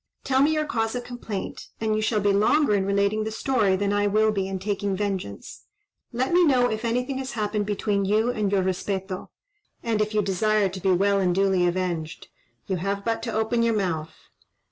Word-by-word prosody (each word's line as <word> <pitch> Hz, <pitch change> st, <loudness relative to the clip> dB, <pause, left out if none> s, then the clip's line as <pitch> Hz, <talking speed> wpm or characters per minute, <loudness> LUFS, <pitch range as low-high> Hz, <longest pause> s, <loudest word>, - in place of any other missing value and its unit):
Tell 265 Hz, 0 st, +2 dB
me 295 Hz, +3 st, +4 dB
your 305 Hz, 0 st, 0 dB
cause 225 Hz, -4 st, -1 dB
of 245 Hz, -, -3 dB
complaint, 240 Hz, -5 st, -6 dB
and 220 Hz, -1 st, 0 dB
you 215 Hz, -, 0 dB
shall 215 Hz, -1 st, +1 dB
be 200 Hz, 0 st, +2 dB
longer 220 Hz, +6 st, +3 dB
in 195 Hz, -1 st, +1 dB
relating 200 Hz, +2 st, +1 dB
the 220 Hz, -, -3 dB
story 220 Hz, -3 st, +1 dB
than 200 Hz, +1 st, 0 dB
I 205 Hz, 0 st, +2 dB
will 215 Hz, +2 st, +3 dB
be 195 Hz, -2 st, -1 dB
in 195 Hz, 0 st, -3 dB
taking 200 Hz, 0 st, -2 dB
vengeance. 190 Hz, -, -4 dB, 0.5 s
Let 255 Hz, +6 st, -1 dB
me 355 Hz, +1 st, +6 dB
know 250 Hz, -6 st, +3 dB
if 220 Hz, +1 st, -3 dB
anything 250 Hz, +3 st, -1 dB
has 265 Hz, 0 st, -5 dB
happened 210 Hz, -2 st, -1 dB
between 205 Hz, -1 st, 0 dB
you 215 Hz, +4 st, +2 dB
and 210 Hz, -4 st, -1 dB
your 195 Hz, -2 st, +2 dB
respeto; 190 Hz, 0 st, -3 dB, 0.5 s
and 225 Hz, -2 st, 0 dB
if 215 Hz, 0 st, -1 dB
you 210 Hz, -, +3 dB
desire 200 Hz, +1 st, +1 dB
to 185 Hz, +1 st, -7 dB
be 190 Hz, 0 st, +2 dB
well 200 Hz, +2 st, +3 dB
and 180 Hz, -2 st, +1 dB
duly 190 Hz, -2 st, +3 dB
avenged. 175 Hz, -3 st, -3 dB, 0.4 s
You 190 Hz, -, -2 dB
have 200 Hz, +3 st, -3 dB
but 225 Hz, -1 st, -1 dB
to 230 Hz, 0 st, -4 dB
open 220 Hz, +2 st, +1 dB
your 230 Hz, -1 st, +2 dB
mouth." 165 Hz, -6 st, -2 dB
205 Hz, 210 wpm, -25 LUFS, 195-225 Hz, 0.5 s, me